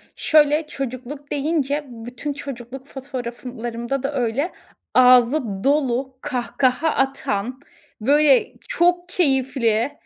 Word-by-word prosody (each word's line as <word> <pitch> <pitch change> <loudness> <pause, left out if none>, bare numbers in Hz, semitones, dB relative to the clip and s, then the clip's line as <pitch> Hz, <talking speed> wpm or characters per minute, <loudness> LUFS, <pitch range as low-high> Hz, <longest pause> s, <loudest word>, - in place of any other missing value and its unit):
Şöyle: 300 0 +3
Çocukluk 275 +1 -6
deyince 295 0 0
bütün 245 +4 -6
çocukluk 265 -2 -8
fotoğraflarımda 245 -1 -5
da 275 +2 -2
öyle 265 +5 -1 0.4
ağzı 250 -4 +4
dolu, 265 -2 +1
kahkaha 260 +2 0
atan, 260 -4 -1 0.4
böyle, 285 +2 +4
çok 350 +1 +1
keyifli, 265 -7 +1
265 Hz, 90 wpm, -22 LUFS, 245-290 Hz, 0.4 s, ağzı